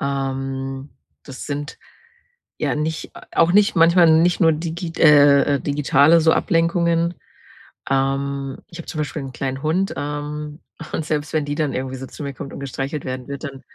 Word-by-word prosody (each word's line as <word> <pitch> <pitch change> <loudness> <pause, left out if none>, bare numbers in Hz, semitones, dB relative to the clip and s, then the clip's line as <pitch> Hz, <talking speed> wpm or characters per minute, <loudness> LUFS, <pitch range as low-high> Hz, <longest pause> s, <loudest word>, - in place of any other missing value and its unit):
Ähm, 135 0 -3 0.4
das 135 -2 -9
sind 145 +1 -5 0.8
ja - - 0
nicht 160 +1 -3
au - - -9
auch 165 +1 +4
nicht 205 -2 +4
manchmal 170 0 +6
nicht 175 +3 +2
nur 165 -2 +5
digi 165 +2 -4
äh, 145 -2 +6
äh, - - -5
digitale 145 +2 +4
so 160 0 +5
Ablenkungen. 170 -1 +1 0.8
Ähm, 135 0 -1
ich 170 - -12
habe - - -9
zum - - -6
Beispiel 150 0 -3
'n 135 - -7
kleinen 135 +2 -4
Hund, 180 +5 0
ähm, 150 +1 -5 0.3
und 160 - -2
selbst 150 -1 -2
wenn 155 -2 0
die 145 - -3
dann 150 -2 0
irgendwie 130 0 -3
so 130 0 -7
zu 150 - -9
mir 140 - -4
kommt 135 - -8
und - - -7
gestreichelt 140 +2 -4
werden 130 0 -5
wird, 140 +2 -6
dann 135 -2 -8
145 Hz, 180 wpm, -21 LUFS, 135-165 Hz, 0.8 s, manchmal